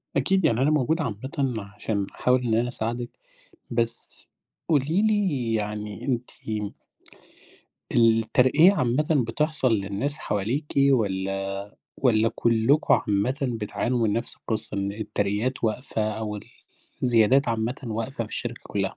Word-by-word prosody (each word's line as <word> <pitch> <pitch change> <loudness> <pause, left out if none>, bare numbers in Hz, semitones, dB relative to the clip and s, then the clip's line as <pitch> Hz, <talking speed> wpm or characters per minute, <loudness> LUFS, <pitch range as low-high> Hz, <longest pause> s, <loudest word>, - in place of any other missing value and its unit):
أكيد، 190 -3 +2
يعني 120 -4 +2
أنا 140 - +4
موجود 155 +3 +1
عامةً 130 +1 -2 0.2
عشان 100 -1 -2
أحاول 125 0 +2
إن 115 -2 0
أنا 120 +2 +2
أساعدِك، 120 0 -3 0.6
بس 115 0 -2 0.4
قولي 160 +5 +2
لي 185 - +1
يعني 105 -1 -3
أنتِ 125 -2 -2 1.6
الترقية 120 - +5
عامةً 150 -3 +1 0.2
بتحصل 150 -1 +1
للناس 105 +7 -1
حواليكِ 110 +9 -2 0.3
والّا 95 -3 -1 0.2
والّا 115 -4 +3
كلكم 115 +6 +3
عامةً 105 +6 0
بتعانوا 120 0 -1
من 105 - +1
نفس 115 +2 -2
القصة، 110 -2 -3
إن 100 0 -1
الترقيات 105 +3 -2
واقفة 110 +1 -1
أو 105 -1 -4
ال 105 - -9 0.6
الزيادات 125 +2 +4
عامةً 115 +3 -1
واقفة 115 +2 -3
في 110 - -12
الشركة 120 0 -3
كلها؟ 95 -1 -2
115 Hz, 125 wpm, -25 LUFS, 105-130 Hz, 1.6 s, الترقية